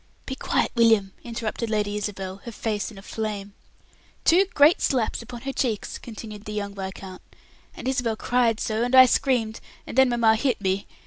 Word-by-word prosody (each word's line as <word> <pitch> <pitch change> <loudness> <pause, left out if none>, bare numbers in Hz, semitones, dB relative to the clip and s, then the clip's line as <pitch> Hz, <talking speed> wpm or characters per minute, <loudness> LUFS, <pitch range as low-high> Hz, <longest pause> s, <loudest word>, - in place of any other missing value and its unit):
"Be 265 - -4
quiet, - - 0
William!" 225 -5 +3
interrupted 230 -1 -4
Lady 210 -1 0
Isabel, 195 -2 -4
her 235 - -6
face 215 -2 -2
in 215 - -13
a 195 - -11
flame. 205 -2 -4 0.7
"Two 365 +4 +5
great 295 +3 +6
slaps 245 -4 0
upon 240 0 -9
her 270 +1 -4
cheeks," 230 -7 -2
continued 215 -2 -9
the 210 - -6
young 200 -1 -3
viscount; 190 -1 -7 0.6
"and - - -6
Isabel 250 -4 0
cried 235 -1 +1
so, 220 0 -1
and 245 +2 +1
I 260 0 +10
screamed, 240 -3 +1 0.3
and - - -8
then 265 -1 +5
mamma 230 -2 +3
hit 255 0 0
me. 190 0 -1
220 Hz, 180 wpm, -25 LUFS, 205-245 Hz, 0.7 s, I